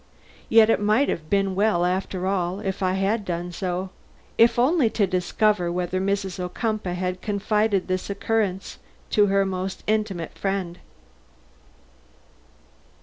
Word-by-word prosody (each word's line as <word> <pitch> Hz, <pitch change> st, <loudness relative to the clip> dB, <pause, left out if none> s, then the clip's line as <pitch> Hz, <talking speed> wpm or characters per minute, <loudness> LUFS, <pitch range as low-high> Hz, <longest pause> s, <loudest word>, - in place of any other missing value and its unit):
Yet 225 Hz, 0 st, +6 dB
it -, -, +2 dB
might 215 Hz, +7 st, +3 dB
have 155 Hz, -1 st, -4 dB
been 195 Hz, -1 st, +1 dB
well, 195 Hz, -3 st, +2 dB
after 185 Hz, 0 st, -2 dB
all, 185 Hz, -1 st, -1 dB
if 195 Hz, -2 st, -4 dB
I 185 Hz, -1 st, +1 dB
had 200 Hz, +3 st, 0 dB
done 175 Hz, -1 st, -4 dB
so, 185 Hz, +1 st, -3 dB, 0.4 s
if 230 Hz, +1 st, +4 dB
only 260 Hz, 0 st, +3 dB
to 215 Hz, -2 st, +1 dB
discover 185 Hz, 0 st, +1 dB
whether 180 Hz, +1 st, -2 dB
Mrs. 195 Hz, -1 st, -2 dB
Ocumpaugh 180 Hz, +1 st, -2 dB
had 180 Hz, 0 st, -3 dB
confided 210 Hz, -1 st, 0 dB
this 185 Hz, +1 st, -2 dB
occurrence 200 Hz, -1 st, -2 dB, 0.3 s
to 210 Hz, -1 st, +4 dB
her 195 Hz, 0 st, +2 dB
most 190 Hz, 0 st, -4 dB
intimate 210 Hz, -6 st, -1 dB
friend. 195 Hz, -3 st, -2 dB
195 Hz, 135 wpm, -24 LUFS, 180-210 Hz, 0.4 s, Yet